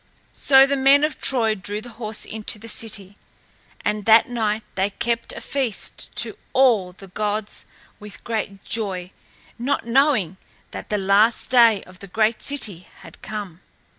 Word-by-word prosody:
So 270 -1 +6
the 280 +1 0
men 275 +2 +5
of 300 -3 -1
Troy 230 -5 +2
drew 205 +1 -5
the 240 +3 -10
horse 215 -1 -3
into 220 0 -3
the 225 +2 -12
city. 205 -3 -3 0.7
And 210 -1 -1
that 225 0 +6
night 220 -3 -1
they 190 +1 0
kept 230 +3 -2
a - - -7
feast 260 -7 -4
to - - -1
all 230 -9 +3
the 195 +1 -14
gods 210 +2 -3 0.3
with 210 -1 -11
great 215 -4 -4
joy 195 -4 -3 0.5
not 270 +2 -1
knowing 235 - +2 0.3
that - - -8
the 210 - 0
last 205 +6 +2
day 230 -5 +5
of 185 0 -16
the 200 - -10
great 220 +4 +1
city 210 -11 -3 0.2
had - - -14
come. 195 -4 -7
215 Hz, 160 wpm, -22 LUFS, 200-240 Hz, 0.7 s, So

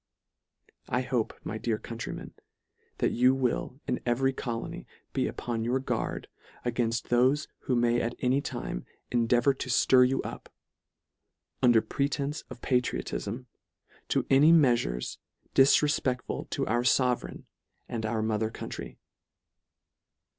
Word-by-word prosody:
I 125 - +1
hope, 125 -3 -1
my 110 - -4
dear 115 -2 0
countrymen, 115 +1 -7 0.6
that - - +1
you 125 +2 +4
will 130 0 -1
in 125 - -1
every 135 +2 +1
colony 120 -3 -5 0.3
be - - +1
upon 115 -2 -3
your 125 +3 +1
guard 135 - -3 0.4
a 120 - +1
gainft 120 0 -1
thofe 130 +5 +3 0.2
who 130 - +1
may 120 0 +3
at 120 +1 -2
any 130 +2 +1
time - - -4 0.3
endeavour 120 +3 +3
to 130 -1 -6
ftir 125 +1 +5
you 135 - 0
up, - - -8 1.1
under 120 -3 +5
pretences 140 +3 -2
of 125 -2 -10
patriotifm, 125 -2 -1 0.6
to - - +1
any 145 +4 +7
meafures 120 - +2 0.3
difrefpectful 135 -2 +2
to - - -1
our 120 +3 +1
fovereign 125 0 +1 0.4
and 115 -2 -4
our 110 0 -1
mother 110 0 0
country. - - -7
125 Hz, 125 wpm, -29 LUFS, 115-135 Hz, 1.1 s, any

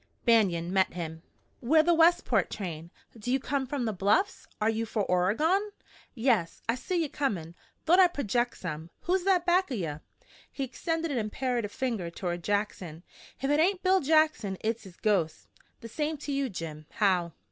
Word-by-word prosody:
Banion 185 -7 +3
met 190 -1 +2
him. 160 -2 -5 0.4
"We're 310 +6 +4
the 345 +2 +4
Westport 335 +1 +3
train. 170 -5 -6 0.3
Do 230 +2 -4
you 265 - +2
come 270 0 -2
from 265 -2 -2
the 220 - -1
Bluffs? 205 - +1
Are 215 - +1
you 225 0 +1
for 220 -2 -1
Oregon?" 300 - +2 0.5
"Yes. 225 -9 +1
I 230 - +3
seen 340 +8 -2
ye - - -1
comin'. 195 - -2 0.3
Thought 350 +4 +5
I'd 360 -2 +6
projeck 240 -2 0
some. 160 -2 -6
Who's 360 +1 0
that 370 -3 +3
back 360 +1 +3
of 255 - -2
ye?" 165 -6 -2 0.6
He 275 - -4
extended 325 +5 -2
an 255 - 0
imperative 230 0 -2
skinny 260 +3 -1
finger 185 -7 -3
toward 175 0 -4
Jackson. 190 -5 -2 0.4
"If 275 - +1
it 295 - +3
hain't 370 +3 +2
Bill 380 0 +4
Jackson 305 -10 +2
hit's 225 0 -2
his 185 -2 -13
ghost!" 185 -7 0 0.3
"The 230 - -7
same 300 +6 -2
to 290 - -3
you, 275 -1 0
Jim. 155 -5 -7
How!" 180 -5 +1
230 Hz, 180 wpm, -29 LUFS, 185-310 Hz, 0.6 s, I'd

